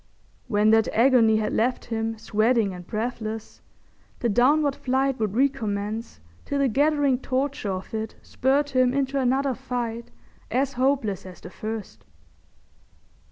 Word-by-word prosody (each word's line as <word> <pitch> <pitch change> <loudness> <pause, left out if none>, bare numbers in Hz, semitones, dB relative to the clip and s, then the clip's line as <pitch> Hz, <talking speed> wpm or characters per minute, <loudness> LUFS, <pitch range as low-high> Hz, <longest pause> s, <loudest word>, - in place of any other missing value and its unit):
When 210 -2 +3
that 220 0 +4
agony 230 -2 +5
had 215 - -1
left 245 +3 0
him 225 -1 -2
sweating 215 -1 +1
and 180 -1 -10
breathless, 220 -1 -4 0.6
the 235 - -1
downward 275 +6 +3
flight 265 0 0
would 215 -2 -1
recommence 220 - -1 0.2
till 285 - -3
the 275 -1 +3
gathering 285 0 +2
torture 265 -4 -2
of 185 +2 -5
it 220 0 -4
spurred 280 +3 0
him 255 0 +3
into 275 0 0
another 265 +1 +1
fight 240 -2 -4 0.4
as 275 +2 0
hopeless 255 -6 0
as 180 - -11
the 180 - -11
first. 215 0 -6
240 Hz, 135 wpm, -25 LUFS, 220-270 Hz, 0.6 s, agony